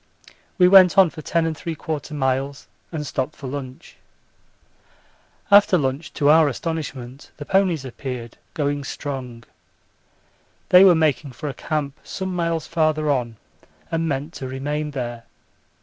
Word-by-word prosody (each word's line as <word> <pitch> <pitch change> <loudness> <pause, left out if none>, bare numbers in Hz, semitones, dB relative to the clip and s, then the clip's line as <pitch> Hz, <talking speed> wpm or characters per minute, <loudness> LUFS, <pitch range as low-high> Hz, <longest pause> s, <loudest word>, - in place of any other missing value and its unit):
We 180 -2 +6
went 185 0 +7
on 190 -4 +6
for 155 - -9
10 165 0 0
3/4 155 -1 -5
miles 135 +1 -1 0.3
and 155 -3 -4
stopped 145 +2 -3
for 145 - -10
lunch. 130 -1 -7 1.5
After 200 -2 +7
lunch 140 +1 -2
to 145 - +1
our 155 +1 +6
astonishment 140 -3 -5
the 145 - -7
ponies 180 -7 +1
appeared, 125 -2 -7 0.2
going 145 -1 -1
strong. 130 -4 -6 1.3
They 180 +1 +8
were 185 -3 +7
making 155 -3 0
for 150 +3 -5
a - - -5
camp 140 0 -3
some 190 -1 -5
miles 170 -2 -1
farther 155 -2 +1
on, 120 -5 -2 0.5
and 165 0 0
meant 145 +3 -3
to 130 - -6
remain 145 +3 -3
there. 120 -4 -5
145 Hz, 135 wpm, -22 LUFS, 135-165 Hz, 1.5 s, They